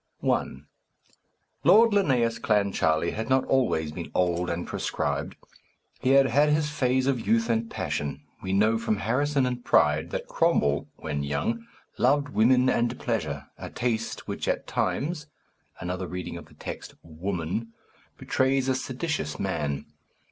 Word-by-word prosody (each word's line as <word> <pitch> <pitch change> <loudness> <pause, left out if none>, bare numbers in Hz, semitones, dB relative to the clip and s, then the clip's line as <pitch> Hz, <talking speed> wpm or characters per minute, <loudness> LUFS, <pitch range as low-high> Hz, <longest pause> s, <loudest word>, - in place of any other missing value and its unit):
I. - - +2 1.2
Lord 230 +1 +7
Linnæus 130 - +2
Clancharlie 95 -6 +2
had 110 +3 -4
not 130 0 +3
always 95 - +1
been 85 +2 -6
old 90 0 +1
and 85 +1 -2
proscribed; - - -2 0.6
he 130 - 0
had 135 0 +7
had 145 +4 +3
his 150 0 +1
phase 130 -3 +1
of 130 -6 0
youth 115 +2 +3
and 115 0 0
passion. 70 -1 -3 0.2
We 95 - -3
know 110 +3 +3
from 115 -2 0
Harrison 135 +6 +1
and 125 -1 -3
Pride 75 +2 +3
that - - -4
Cromwell, 70 0 +1
when 70 - -3
young, 75 +12 -2 0.3
loved 145 +3 +3
women 125 +1 +4
and 120 -1 +1
pleasure, 75 - -2
a - - -6
taste 115 -2 -2
which, - - -4
at - - 0
times 150 0 -1 0.5
(another 90 +1 -3
reading 90 0 -5
of - - -9
the - - -20
text - - -7
"Woman"), 90 +6 -4 0.5
betrays 130 0 +1
a 130 - +3
seditious 135 +4 -3
man. 75 -7 -2
115 Hz, 145 wpm, -27 LUFS, 90-130 Hz, 1.2 s, Lord